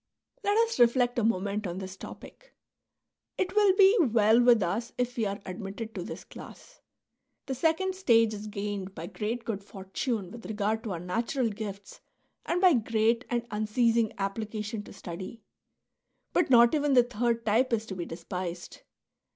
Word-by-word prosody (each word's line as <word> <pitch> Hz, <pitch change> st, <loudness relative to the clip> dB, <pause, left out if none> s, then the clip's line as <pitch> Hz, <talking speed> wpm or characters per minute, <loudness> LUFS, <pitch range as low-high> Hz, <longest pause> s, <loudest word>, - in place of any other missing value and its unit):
Let 410 Hz, +1 st, +2 dB
us 460 Hz, -, -5 dB
reflect 245 Hz, 0 st, +4 dB
a -, -, 0 dB
moment 205 Hz, -1 st, 0 dB
on 175 Hz, +1 st, -5 dB
this 190 Hz, 0 st, -6 dB
topic. -, -, -12 dB, 0.8 s
It 375 Hz, +1 st, -1 dB
will 410 Hz, -3 st, +5 dB
be 390 Hz, +2 st, +6 dB
well 225 Hz, -, +4 dB
with 240 Hz, -4 st, +5 dB
us 210 Hz, +7 st, -2 dB
if 245 Hz, 0 st, -1 dB
we 225 Hz, -3 st, 0 dB
are 200 Hz, 0 st, -4 dB
admitted 200 Hz, +4 st, -6 dB
to -, -, -5 dB
this -, -, -7 dB
class. -, -, -13 dB, 0.6 s
The 270 Hz, -, -3 dB
second 325 Hz, +7 st, +1 dB
stage 230 Hz, -, +3 dB
is 210 Hz, 0 st, -6 dB
gained 200 Hz, -2 st, -5 dB
by 165 Hz, -, -6 dB
great 220 Hz, +5 st, -4 dB
good 200 Hz, -3 st, -3 dB
fortune 195 Hz, 0 st, -4 dB
with 235 Hz, +1 st, -9 dB
regard 215 Hz, +1 st, -1 dB
to 205 Hz, -, -2 dB
our 170 Hz, -, -4 dB
natural 230 Hz, -, -1 dB
gifts 205 Hz, -2 st, -7 dB, 0.5 s
and 350 Hz, -, +1 dB
by 370 Hz, -2 st, +6 dB
great 230 Hz, 0 st, +1 dB
and 240 Hz, -1 st, -1 dB
unceasing 220 Hz, +1 st, +1 dB
application 210 Hz, +2 st, -3 dB
to -, -, -12 dB
study. 190 Hz, +4 st, -8 dB, 0.9 s
But 350 Hz, -5 st, +2 dB
not 235 Hz, -2 st, +6 dB
even 295 Hz, -2 st, +2 dB
the 245 Hz, -, +7 dB
third 235 Hz, -1 st, -1 dB
type 235 Hz, +5 st, +2 dB
is 225 Hz, -1 st, 0 dB
to 195 Hz, -, -6 dB
be 175 Hz, -2 st, -4 dB
despised. 175 Hz, +1 st, -6 dB
225 Hz, 165 wpm, -28 LUFS, 200-245 Hz, 0.9 s, the